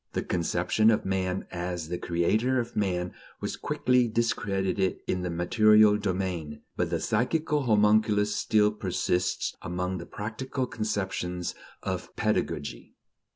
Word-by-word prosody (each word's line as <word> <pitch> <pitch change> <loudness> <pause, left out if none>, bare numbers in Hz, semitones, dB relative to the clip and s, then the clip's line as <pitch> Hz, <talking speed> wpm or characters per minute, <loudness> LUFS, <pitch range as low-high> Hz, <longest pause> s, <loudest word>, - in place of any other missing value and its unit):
The - - -1
conception 90 +5 +2
of 110 - +2
man 95 -1 -1
as 90 -2 -4
the 90 - -3
creator 110 +10 +1
of 120 0 -4
man 90 -3 -1 0.3
was - - -3
quickly 125 -1 +2
discredited 100 -4 0
in 90 - -1
the 90 - -2
material 105 +4 +5
domain; 90 -7 -3
but - - 0
the - - -1
psychical 150 +7 +1
homunculus 105 -2 +3
still 105 -2 +3
persists 90 -3 -1
among 90 +2 -3
the 85 - -8
practical 125 +5 -4
conceptions 95 -6 -3 0.3
of - - -4
pedagogy. 70 -5 -2
100 Hz, 125 wpm, -28 LUFS, 90-110 Hz, 0.3 s, material